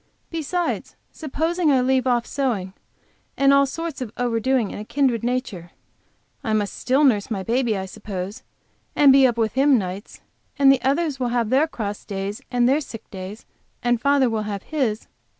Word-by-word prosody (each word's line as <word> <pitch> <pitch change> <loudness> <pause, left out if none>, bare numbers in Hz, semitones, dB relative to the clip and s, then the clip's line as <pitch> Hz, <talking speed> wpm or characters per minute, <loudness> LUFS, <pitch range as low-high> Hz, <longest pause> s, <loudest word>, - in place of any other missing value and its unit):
Besides, 330 +2 -2 0.2
supposing 320 +3 -1
I 270 -2 +4
leave 260 0 +1
off 240 -2 +2
sewing 225 -10 -2 0.6
and 275 0 +5
all 280 0 +5
sorts 325 0 -5
of 235 -4 -4
over 240 -2 0
doing 250 -2 0
of - - -6
a - - -5
kindred 250 -1 0
nature, 240 -8 -3 0.7
I 220 - -1
must 210 +3 -2
nurse 260 -6 +4
baby, 225 +2 0
I 190 - -3
suppose, 200 +2 -6 0.5
and 285 -2 +7
be 270 -1 +6
up 235 -2 -2
with 220 -2 0
him 270 +1 +4
nights 190 0 -6 0.4
and 275 -1 +6
others 280 +1 0
will 250 - 0
have 235 -2 0
their 280 +5 +4
cross 210 -8 -5
days 200 +1 -5
and 245 -1 +2
their 280 +4 +3
sick 225 -6 -9 0.8
and 240 -1 +1
father 280 -1 +3
will 225 -2 -1
have 205 -2 -5
his. 250 -8 -2
245 Hz, 170 wpm, -22 LUFS, 215-275 Hz, 0.8 s, and